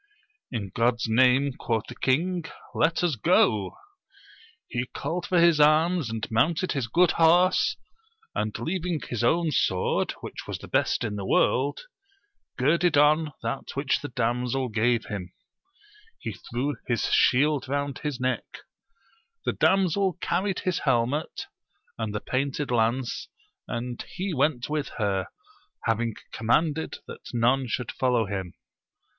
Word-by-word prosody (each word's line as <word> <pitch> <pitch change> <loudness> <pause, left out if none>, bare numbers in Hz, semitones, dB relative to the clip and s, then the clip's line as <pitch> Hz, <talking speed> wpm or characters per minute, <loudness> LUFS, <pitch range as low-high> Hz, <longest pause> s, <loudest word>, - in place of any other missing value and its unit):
In 105 -6 -3
God's 115 +1 +1
name, 130 +4 +4
quoth 115 -2 -1
the - - -8
king, 170 +6 0 0.3
let 165 +2 +1
us 170 -5 +2
go! 105 -2 +2 0.9
He 125 0 -3
called 170 +7 -4
for 180 - +3
his 170 -2 +5
arms 155 0 +4
and 110 -1 -3
mounted 160 +10 +2
his 135 -5 -1
good 170 +8 +4
horse, 175 +3 +4 0.6
and 105 -2 -2
leaving 175 -1 -2
his 120 -1 -3
own 165 +6 +2
sword, 95 -9 +1
which - - -8
was - - -3
the - - -11
best - - +1
in 105 -2 -3
the 100 - -4
world, 135 +8 +2 0.8
girded 155 +4 +3
on 150 +1 +4
that 115 +4 -4
which 140 -1 0
the 145 - -4
damsel 125 +1 -1
gave 115 +1 +1
him; 90 -4 -6 0.8
he - - -5
threw 130 +3 -3
his 120 -3 0
shield 140 +1 +3
round 140 0 -2
his 145 -4 -3
neck: 130 0 -3 0.8
the - - +1
damsel 190 -1 +2
carried 185 +2 -1
his 185 -2 -1
helmet 130 +3 0 0.5
and 110 -2 -2
the 105 - -2
painted 135 +1 -2
lance, 120 +2 0 0.4
and 120 +1 -4
he 190 0 -2
went 140 -3 +1
with 150 -1 -2
her, 100 -4 0 0.6
having 115 0 0 0.2
conmianded 150 +8 +1
that - - -10
none 125 +3 +2
should 120 0 -3
follow 125 -3 +1
him. 95 -3 -5
130 Hz, 140 wpm, -26 LUFS, 115-160 Hz, 0.9 s, his